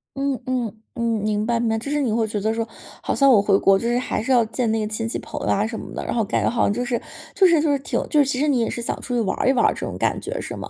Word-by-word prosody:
嗯 275 0 0
嗯， 245 -4 -2 0.2
嗯， 235 - -3 0.2
明 210 0 0
白 235 0 +1
明 235 - 0
白。 225 - +1
就 245 +6 -5
是 295 0 +1
你 245 -6 0
会 225 0 +1
觉 210 -1 -3
得 220 +2 +1
说 225 0 -2 0.3
好 - - -1
像 275 -1 +4
我 215 -5 +6
回 200 -1 +3
国 195 0 +4
就 230 - -3
是 240 +1 +1
还 250 - -2
是 265 - -1
要 245 -2 +5
见 230 +1 -2
那 225 - 0
个 215 - -1
亲 225 +1 -3
戚 - - -3
朋 - - -7
友 - - -3
啊 205 - +2
什 225 -1 -5
么 - - -9
的， - - -4
然 - - -3
后 230 -2 +1
感 205 - -1
觉 - - +2
好 235 - 0
像 205 - +2
就 245 +2 -2
是 245 -1 -1 0.4
就 385 - +5
是 330 -3 +4
就 305 -2 +2
是 280 - +2
挺 270 - -2
就 300 - +3
是 285 - +5
其 265 -1 -1
实 300 - +2
你 265 -4 +2
也 230 - 0
是 235 - -4
想 235 - -3
出 250 - -5
去 235 - +2
玩 205 - -1
儿 - - 0
一 265 - +5
玩 245 - +3
儿 - - +3
这 - - -5
种 - - -5
感 - - 0
觉， - - -5
是 - - -6
吗？ - - -7
235 Hz, 385 characters per minute, -22 LUFS, 220-265 Hz, 0.4 s, 我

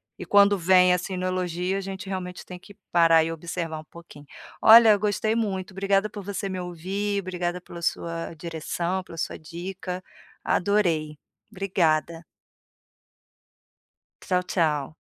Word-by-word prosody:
e - - -8
quando 200 -1 +5
vem, 180 +1 +5
assim, 180 +1 -2
no 180 - -3
elogio 180 0 -1
a 195 - -2
gente 195 0 -7
realmente 180 -1 -5
tem 180 -1 -9
que 200 +2 -16 0.2
parar 165 -2 +5
e 165 - -3
observar 165 -1 -5
um 155 - -10
pouquinho. 155 -3 -14 0.4
Olha 225 +1 +9
eu 205 -2 +5
gostei 215 +2 0
muito, 195 -4 -2
obrigada 195 +1 +1
por 205 -2 -8
você 200 0 -4
me 185 -1 -4
ouvir, 190 +4 -3
obrigada 180 -1 -3
pela 170 -1 -11
sua 165 0 -3
direção, 170 +3 -3
pela 165 - -12
sua - - -3
dica, 180 +3 -6 0.4
adorei, 170 -7 +1 0.3
obrigada. 170 -4 0 2.0
Tchau, 180 0 +1
tchau. 155 -5 -1
180 Hz, 145 wpm, -25 LUFS, 170-195 Hz, 2.0 s, Olha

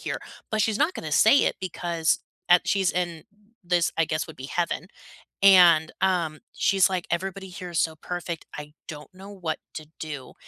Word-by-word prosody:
here," - - -3 0.3
but 215 - 0
she's 220 0 0
not 310 +5 +2
gonna - - -6
say 280 - +6
it - - 0
because, 170 -3 -1 0.3
uh, 175 - +9
she's 195 -3 +1
in 175 -3 -3 0.4
this, 175 -1 +1
I 165 - +3
guess, 155 0 -2
would 160 - -10
be 130 +1 -7
heaven. 175 +2 -2 0.5
And, 175 -5 +7
um, 175 -5 +1
she's 195 -2 +3
like, 180 -2 -2
"Everybody 190 +2 -3
here 180 -1 -8
is 170 - 0
so 160 -2 0
perfect. 175 0 -5
I 150 0 -8
don't 150 +2 -9
know 195 +2 -11
what 170 -5 -4 0.2
to 155 -1 -7
do." 145 -5 -7
175 Hz, 185 wpm, -25 LUFS, 160-190 Hz, 0.5 s, uh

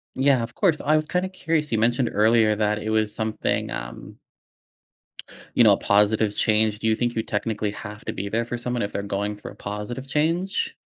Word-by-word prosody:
Yeah, 135 -1 +3
of 115 +1 -7
course. 175 -7 +2
I 155 - +2
was 155 0 +1
kinda 180 +3 -1
curious, 165 -6 -1
you 115 - +2
mentioned 120 +2 +2
earlier 110 0 +4
that 105 0 0
it 110 - -3
was 110 -1 +1
something, 110 -1 -1
um - - -7 1.4
you - - +6
know, - - +7
a - - +1
positive 105 +1 +2
change. 110 -1 +2
Do 110 - -1
you 110 - +3
think 120 +1 -1
you 110 - 0
technically 105 -1 -2
have 105 0 -9
to - - -3
be 100 - -4
there 115 +3 0
for 120 +1 -4
someone 120 0 -3
if 100 - -2
they're 100 - -2
going 100 +1 -2
through 105 - -9
a - - -14
positive 105 +6 -6
change? 165 +7 0
110 Hz, 210 wpm, -24 LUFS, 105-130 Hz, 1.4 s, know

